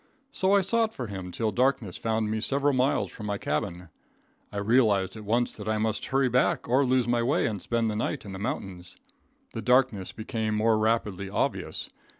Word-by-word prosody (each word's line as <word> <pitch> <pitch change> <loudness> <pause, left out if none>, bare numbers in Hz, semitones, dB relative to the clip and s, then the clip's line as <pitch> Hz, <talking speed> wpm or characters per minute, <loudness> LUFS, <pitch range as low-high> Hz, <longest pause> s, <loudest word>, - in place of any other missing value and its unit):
So 190 +1 +2
I 200 - +5
sought 220 +3 +1
for 125 - -4
him 95 -4 -6
till 110 +3 -1
darkness 125 -7 +1
found 110 -1 -1
me 110 0 -1
several 140 +4 +2
miles 130 +2 +1
from 105 - -7
my 100 -1 -1
cabin. 85 +2 -3 0.6
I - - -6
realized 100 -3 +2
at 110 -1 -9
once 120 +3 +1
that 105 -1 -9
I 110 - +1
must 110 0 -1
hurry 135 0 +2
back, 125 +1 +1
or 130 +4 +3
lose 130 -2 +2
my 120 0 +2
way 140 +8 +1
and 105 -4 -2
spend 115 -1 0
the 105 - -1
night 110 - -2
in 100 - -7
the 95 - -6
mountains. 95 -3 -5 0.6
The - - -4
darkness 125 -6 +2
became 110 -1 -3
more 110 0 +3
rapidly 105 -3 0
obvious. - - -2
110 Hz, 195 wpm, -27 LUFS, 100-125 Hz, 0.6 s, I